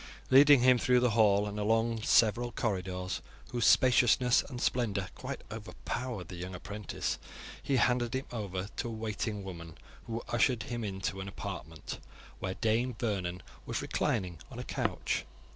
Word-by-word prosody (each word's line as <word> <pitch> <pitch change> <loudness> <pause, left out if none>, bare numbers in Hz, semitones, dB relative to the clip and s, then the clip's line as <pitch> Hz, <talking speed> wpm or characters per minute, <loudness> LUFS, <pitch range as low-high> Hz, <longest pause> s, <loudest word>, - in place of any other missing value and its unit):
Leading 140 0 +8
him 125 0 +6
through 125 +2 +4
the 125 -1 +2
hall 105 -2 +4
and 105 0 -4
along 115 +2 +1
several 120 +2 +3
corridors, 95 -4 -2 0.3
whose 120 -2 +2
spaciousness 125 0 +5
and 125 - -8
splendour 105 -7 0
quite - - -6
overpowered 120 -9 -5
the 90 - -8
young 90 +1 -6
apprentice, 105 +2 -4 0.4
he 140 - 0
handed 125 -1 +2
him 130 - -2
over 100 -4 -4
to - - -2
a - - -4
waiting 110 -1 -3
woman, 85 -4 -8 0.3
who 115 0 -3
ushered 120 -1 +2
him 120 -2 -4
into 95 -1 -3
an 95 - -6
apartment 80 -5 -6 0.4
where 95 0 -3
Dame 115 +3 +1
Vernon 95 -6 -2 0.2
was - - -2
reclining 90 -4 -1
on - - -10
a - - -4
couch. - - -1
110 Hz, 155 wpm, -31 LUFS, 95-120 Hz, 0.4 s, Leading